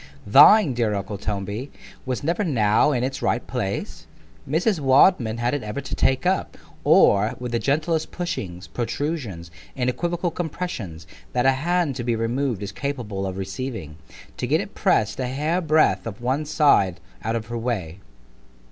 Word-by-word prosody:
Thine, 145 - +7
dear 115 -3 0
uncle 100 0 -4
Toby! 105 +5 -4 0.4
was 130 +1 -2
never 170 +7 0
now 120 - +3
in 125 -3 0
'ts 135 0 -6
right 120 - 0
place——Mrs. 140 - -3
Wadman 130 -4 +4
had 120 +2 0
it 145 - -1
ever 105 +5 -4
to 140 - -7
take 130 +5 +1
up, 185 +1 0 0.3
or, 105 +3 +4
with 125 -1 -5
the 120 - 0
gentlest 155 +5 0
pushings, 100 - -5
protrusions, 120 - -4 0.2
and 125 -1 0
equivocal 175 +4 -2
compressions, 150 - -5 0.3
that 125 - +1
a 135 - +6
hand 165 +1 0
to 120 - -3
be 120 -1 0
removed 115 -1 -1
is 100 - -5
capable 115 -9 -4
of 95 0 -5
receiving——to 95 - -7
get - - +2
it - - -6
press'd 105 +2 +1
a 130 - -1
hair 150 +7 -1
breadth 155 -6 +2
of 110 +1 -7
one 130 +5 -1
side 140 - +3 0.2
out 115 +1 -1
of 115 -1 -3
her 120 +1 -5
way. 100 -8 -3
125 Hz, 160 wpm, -23 LUFS, 105-150 Hz, 0.4 s, Thine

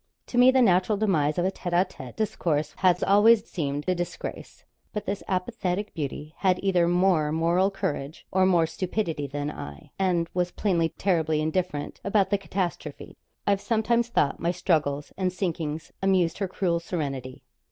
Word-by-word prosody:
To 245 - -5
me 250 +1 +8
the 260 -1 +5
natural 190 +1 +3
demise 160 -8 +1
of 175 - +1
a 190 - +1
tête 175 -2 -5
à 180 +2 +3
tête 130 -8 -10
discourse 160 -9 -1
has 180 -1 +3
always 210 +2 +5
seemed 145 -2 -3
a 185 - +3
disgrace. 175 -1 -6 0.3
But 210 -1 -4
this 200 0 -3
apathetic 190 0 -2
beauty 150 0 -5
had 185 -2 +2
either 180 -3 +3
more 175 -4 +2
moral 170 +4 +2
courage 150 -6 -4
or 185 0 +3
more 175 -3 +4
stupidity 165 -3 -2
than 145 +2 -3
I, 70 - -9
and 180 -3 +1
was 180 0 0
plainly 175 -4 0
terribly 160 -5 0
indifferent 155 -1 -2
about 200 -1 +2
the 200 - +2
catastrophe. 190 -2 -4 0.3
I've 200 -1 +2
sometimes 235 +1 +1
thought 145 -11 +1
my 170 - 0
struggles 155 -5 0
and 185 -1 0
sinkings 165 -4 -3
amused 185 -3 +2
her 195 - 0
cruel 175 -2 0
serenity. 140 -7 -5
180 Hz, 165 wpm, -26 LUFS, 155-195 Hz, 0.3 s, me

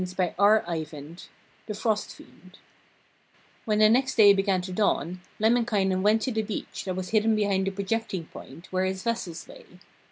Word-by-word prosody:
THE 175 -4 -1 0.5
FROST 215 0 -2
FIEND 185 +1 -18 1.1
When 215 -1 +1
the 215 0 +6
next 260 +4 +2
day 205 -3 +7
began 195 -1 +1
to 185 0 -6
dawn, 180 -3 0 0.2
Lemminkainen 215 -4 +2
went 215 +2 +3
to 260 - -1
the 220 -1 0
beach, 210 -2 -6
that 185 -2 -3
was 185 -1 -5
hidden 220 0 +2
behind 200 -2 0
a - - 0
projecting 195 -2 -3
point, 165 +2 -12
where 185 0 0
his 190 0 -3
vessels 225 -8 -4
lay. - - -14
200 Hz, 155 wpm, -26 LUFS, 185-220 Hz, 1.1 s, day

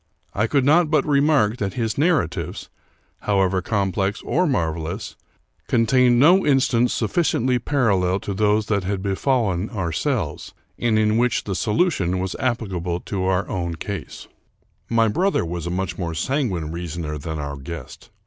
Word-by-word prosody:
I 105 +3 +1
could 135 +2 +1
not 155 +3 +4
but 155 - +2
remark 140 -7 +3
that 100 -4 -3
his 115 -3 -1
narratives, 145 - 0 0.5
however 95 -2 +1
complex 95 0 -1
or 180 +2 +1
marvelous, 85 - -2 0.5
contained 120 +1 +3
no 175 +8 +6
instance 130 -4 +2
sufficiently 125 - +1
parallel 100 -9 +1
to 100 - -4
those 105 +2 +2
that 100 -2 0
had 95 0 -3
befallen 100 -2 0
ourselves, 85 -8 -3 0.2
and 115 -2 +2
in 110 0 +2
which 125 -1 +1
the 100 - -3
solution 105 - +1
was 95 0 -2
applicable 95 -8 -2
to 95 -2 -3
our 95 +1 +1
own 85 -2 -3
case. 100 +4 -7 0.6
My 115 -1 +3
brother 180 - +1
was 85 0 -4
a - - -2
much 90 0 -3
more 85 -3 -3
sanguine 95 - -1
reasoner 85 -2 -5
than 80 +2 -5
our 70 -1 -5
guest. 70 -1 -9
100 Hz, 150 wpm, -22 LUFS, 90-125 Hz, 0.6 s, no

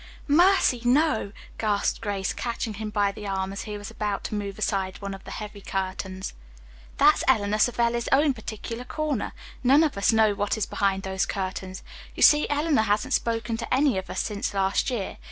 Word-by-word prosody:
"Mercy, 335 -5 +4
no," 250 -4 +2 0.3
gasped 210 -2 0
Grace, 200 -3 -2
catching 235 -2 -3
him 215 +1 -5
by 205 -1 +1
the 205 +1 -8
arm 190 0 -2
as 195 - -5
he 210 -1 -5
was 205 -1 -8
about 210 -2 -3
to - - -5
move 200 -2 -4
aside 195 -3 -1
one 200 -1 -5
of 195 - -10
the - - -9
heavy 210 -1 -7
curtains. 190 0 -4 0.6
"That's - - +5
Eleanor 210 0 +2
Savelli's 235 0 +1
own 285 +1 +4
particular 230 +1 -6
corner. 295 -3 -2 0.3
None 275 +5 +6
of 305 - 0
us 200 - +4
know 220 -2 +4
what 205 +2 -1
is 215 - 0
behind 195 -1 0
those 190 0 -1
curtains. 190 -1 -4 0.3
You - - +1
see, 295 0 +6
Eleanor 295 -3 +2
hasn't 210 0 0
spoken 225 -1 0
to 230 - -6
any 270 -1 +3
of 190 - -9
us - - -1
since 205 -1 -3
last 195 +6 +1
year. 230 -7 -3
210 Hz, 190 wpm, -26 LUFS, 195-240 Hz, 0.6 s, None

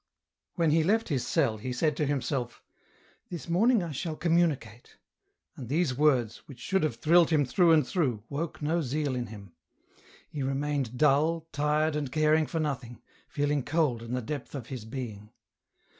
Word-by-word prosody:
When 165 -4 +2
he 160 +1 +3
left 220 +6 +1
his 135 -6 -1
cell 135 -10 +1
he 125 +4 -4
said 150 +4 0
to 150 - 0
himself, 130 -3 -2 0.3
" - - -34
This 170 -7 -7
morning 210 +5 +3
I 170 - -5
shall 155 +3 -4
communicate," 155 -9 -1 0.6
and 125 -4 -8
these 150 -2 +1
words, 130 -6 +2
which 140 - -11
should 190 +8 0
have 155 - 0
thrilled 170 +1 +4
him 150 -3 +3
through 170 +6 +3
and 155 -4 +5
through, 130 - -1
woke 150 +1 -4
no 165 +3 +1
zeal 145 0 -1
in 120 -1 -3
him. 100 -4 -11 0.7
He 145 - -6
remained 135 -2 -2
dull, 155 +3 +3
tired 150 +2 +1
and 145 -4 -3
caring 155 +1 +3
for 165 - -3
nothing, 130 -6 -3 0.3
feeling 145 -1 0
cold 145 -3 0
in 115 +1 -6
the 125 - -3
depth 145 +3 -6
of 130 -5 -5
his 125 -5 -6
being. 110 -4 -7
145 Hz, 175 wpm, -28 LUFS, 125-160 Hz, 0.7 s, and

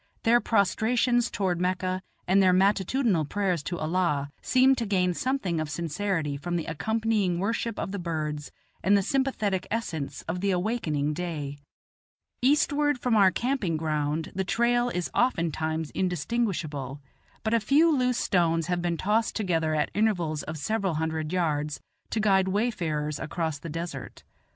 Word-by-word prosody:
Their 240 +1 +5
prostrations 230 +3 +2
toward 180 -4 -1
Mecca 185 0 -1 0.3
and 190 +2 +5
their 185 -1 +5
matutinal 195 - +2
prayers 185 +1 -1
to 175 +4 -4
Allah 155 -4 0
seem 260 +1 +4
to 235 - -1
gain 180 -3 +2
something 200 -7 -1
of 155 -1 -2
sincerity 165 -1 -2
from 175 +4 -3
the 165 - -1
accompanying 210 +2 0
worship 225 +3 -1
of - - -3
the 200 - -3
birds 155 -4 -3 0.3
and 200 +2 +5
the 200 - +1
sympathetic 215 -8 0
essence 170 -11 -3
of 175 +2 -4
the 200 - +1
awakening 175 -7 0
day. 150 -4 -4 0.8
Eastward 290 +1 +3
from 245 -2 +1
our 200 -3 +6
camping 220 - -1
ground 155 0 -1
the 190 - -1
trail 240 +5 +2
is 180 -7 -3
oftentimes 160 - 0
indistinguishable; 165 - -2 0.4
but 220 +1 0
a 230 - +4
few 295 +8 +4
loose 250 -2 +1
stones 165 -3 +2
have 175 0 -1
been 170 -1 -1
tossed 215 +5 +1
together 165 -7 0
at 150 - 0
intervals 175 -8 +1
of 155 - -6
several 195 +2 -1
hundred 160 0 -2
yards, 150 -4 -1 0.3
to 225 - -1
guide 195 -3 +3
wayfarers 170 -8 -1
across 160 -2 -3
the 165 - -7
desert. 165 -4 -6
180 Hz, 150 wpm, -27 LUFS, 160-220 Hz, 0.8 s, our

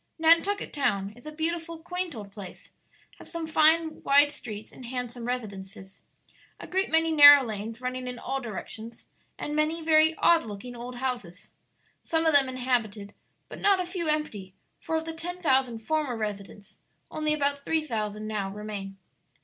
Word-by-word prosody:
Nantucket 335 +5 +3
Town 200 -8 0
is 245 +5 -14
a - - -5
beautiful, 330 +2 -3
quaint 360 0 -4
old 205 -3 -9
place; 195 -3 -11 0.5
has - - -13
some 335 -1 -4
fine 315 0 +3
wide 285 +1 +5
streets 215 -7 -9
and 250 - -11
handsome 245 -1 -5
residences, 195 -5 -6 0.6
a - - -8
great 380 +1 -1
many 325 0 +2
narrow 290 -2 +10
lanes 225 +1 -5
running 255 0 -4
in 250 -1 -5
all 270 +3 -3
directions, 225 0 -7 0.3
and 295 - -4
many 305 +2 +1
very 315 0 +4
odd 335 0 +4
looking 225 +3 -8
old 245 +1 -7
houses, 240 -9 -5 0.5
some 325 0 0
of 320 - +3
them 275 -2 +5
inhabited, 230 -6 -2 0.3
but - - -10
not 400 -2 +4
a 365 - -1
few 350 -2 -4
empty; 215 -12 -2 0.2
for 320 - -3
of 320 0 -1
the 325 - -5
ten 350 +2 -6
thousand 260 -8 +1
former 300 -4 -1
residents 205 -1 -6 0.3
only 305 0 -1
about 285 -1 0
three 320 +1 0
thousand 215 -5 -3
now 210 -3 -2
remain." 200 -1 -7
260 Hz, 165 wpm, -27 LUFS, 215-320 Hz, 0.6 s, narrow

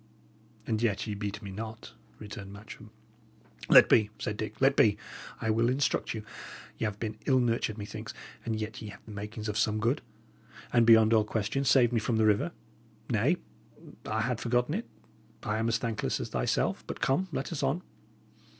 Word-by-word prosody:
"And 110 -1 -1
yet 110 -5 +1
ye 105 - -3
beat 100 0 -4
me 100 - -6
not," 110 +2 -7 0.2
returned 100 -2 -8
Matcham. 100 +2 -11 0.8
"Let - - +9
be," 110 -2 +4
said 105 - -3
Dick 110 +1 -5
"let 135 +1 +4
be. 105 -5 +5 0.4
I 110 - 0
will 115 +2 +2
instruct 130 -2 0
you. 110 - -5 0.6
Y' - - 0
'ave 105 -1 -5
been 110 -1 -4
ill 130 -2 +5
nurtured, 115 -3 0
methinks, 105 -1 -6 0.3
and 110 -1 -2
yet 110 +3 -5
ye 110 - -6
have 105 - -12
the 110 - -10
makings 105 +2 -6
of 105 0 -1
some 110 0 +1
good, 120 +7 +1 0.7
and, 120 -2 +5
beyond 110 -1 +7
all 110 -1 +5
question, 110 +5 -1
saved 125 -2 +5
me 115 - +3
from 110 +2 -1
the 110 - +3
river. 105 +10 +3 0.6
Nay, 125 - +3 0.7
I 110 +1 0
had 125 0 -1
forgotten 125 +4 +1
it; 220 +6 -3 0.6
I 105 +1 -1
am 115 - 0
as 115 0 +2
thankless 115 -2 -2
as - - -4
thyself. - - 0
But, - - -5
come, 180 +8 +1
let 135 0 -3
us 160 - -3
on. 140 +6 0
110 Hz, 185 wpm, -30 LUFS, 105-120 Hz, 0.8 s, Let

